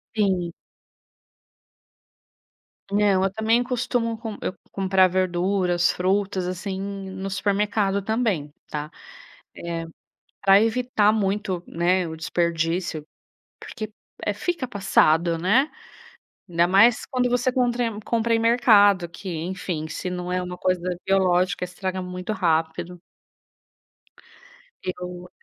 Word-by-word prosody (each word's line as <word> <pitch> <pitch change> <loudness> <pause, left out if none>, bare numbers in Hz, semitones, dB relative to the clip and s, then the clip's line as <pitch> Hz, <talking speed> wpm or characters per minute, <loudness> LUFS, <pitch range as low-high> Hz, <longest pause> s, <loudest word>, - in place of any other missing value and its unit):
Sim. 190 -5 +1 2.4
Não, 200 -2 +3
eu - - +2
também 220 +3 +2
costumo 240 -2 -1
com 220 -2 -6
eu 185 - -3 0.2
comprar 190 -1 +3
verduras, 180 -1 +1
frutas 190 0 0
assim 190 +1 -4
no 195 -1 -5
supermercado 200 0 0
também, 200 -9 -1 0.2
tá. 150 0 -4
Eh, - - -20 1.4
pra 195 0 +6
evitar 225 -2 +2
muito, 195 -3 -1
né, 180 +2 +1
o 160 - -6
desperdício, 165 -1 -1 0.5
porque, 215 -2 -7 0.3
eh, 205 - +1
fica 305 - -2
passado 170 -5 +2
né. 220 - +3 0.8
Ainda 170 0 +3
mais 210 +5 +5
quando 250 -1 0
você 245 +1 +1
contra 240 -3 0
compra 230 0 +1
em - - +3
mercado 210 -6 +5
que 185 +3 -9
enfim, 170 -1 -4
se 180 - -4
não 180 0 -4
é 180 0 0
uma 180 0 -6
coisa 180 -1 0
biológica 185 -1 +2
estraga 185 +1 -4
muito 180 +2 -5
rápido. 165 -1 -1 1.8
Eu 180 -1 -6
190 Hz, 110 wpm, -24 LUFS, 180-215 Hz, 2.4 s, pra